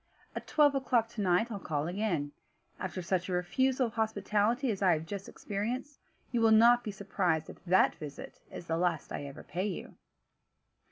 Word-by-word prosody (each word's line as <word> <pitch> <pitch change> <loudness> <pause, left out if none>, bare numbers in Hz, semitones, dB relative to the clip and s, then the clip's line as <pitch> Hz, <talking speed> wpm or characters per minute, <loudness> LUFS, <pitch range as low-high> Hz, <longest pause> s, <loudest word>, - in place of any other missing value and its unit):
At - - -6
twelve 295 -2 +4
o'clock 250 -4 +1
to 230 -2 -5
night 185 +5 +2
I'll 205 - -4
call 150 -5 -2
again; 175 -6 -1 0.5
after 185 0 -4
such 180 +1 -1
a - - -1
refusal 255 +9 +1
of 225 - -5
hospitality 220 +3 +1
as 200 - -4
I 185 -3 +5
have 160 0 -2
just 195 +3 -6
experienced, 245 +8 -4 0.3
you 240 -2 +1
will 225 - +5
not 235 +2 +6
be - - -4
surprised 185 -5 -1
if - - -17
that 185 +1 +4
visit 150 -2 -9
is - - -8
the 165 -1 -1
last 170 -3 -1
I - - -4
ever 140 -1 -9
pay 180 +7 -2
you." 190 - -6
200 Hz, 185 wpm, -31 LUFS, 175-230 Hz, 0.5 s, not